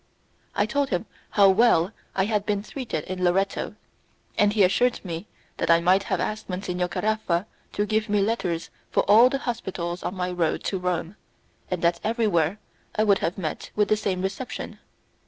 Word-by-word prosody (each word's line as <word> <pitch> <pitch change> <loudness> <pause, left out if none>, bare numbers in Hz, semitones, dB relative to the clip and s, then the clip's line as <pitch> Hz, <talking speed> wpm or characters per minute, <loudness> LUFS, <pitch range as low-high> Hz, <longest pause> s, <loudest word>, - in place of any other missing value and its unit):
I 205 - +3
told 275 +5 0
him 180 +3 -1 0.2
how 200 -2 +6
well 190 -3 +4 0.2
I 190 - +2
had 210 -1 0
been 205 -1 -1
treated 225 - -4
in 185 0 -4
Loretto, 195 +2 +1 0.6
and 205 0 +4
he 210 -1 +4
assured 245 +7 +3
me 170 +3 -5 0.3
that - - -1
I 165 0 +7
might 185 +3 +4
have - - -1
asked 215 -1 -3
Monsignor 180 -1 -2
Caraffa 210 -3 0 0.3
to 205 - 0
give 215 0 0
me 205 0 +2
letters 195 -6 -1 0.2
for - - +2
all 225 +5 +7
the 275 - -1
hospitals 190 -9 -4
on 185 - -3
my 180 -1 -2
road 175 -3 0
to 190 - -1
Rome, 180 +1 -2 0.5
and 180 -2 -3
that 170 0 +3
everywhere 210 -6 +1 0.4
I 215 - +3
would 200 -2 +4
have 170 - -2
met 165 -5 -4
with 210 -1 +2
the 215 - +5
same 190 -3 -2
reception. 195 +7 -5
195 Hz, 180 wpm, -25 LUFS, 180-215 Hz, 0.6 s, I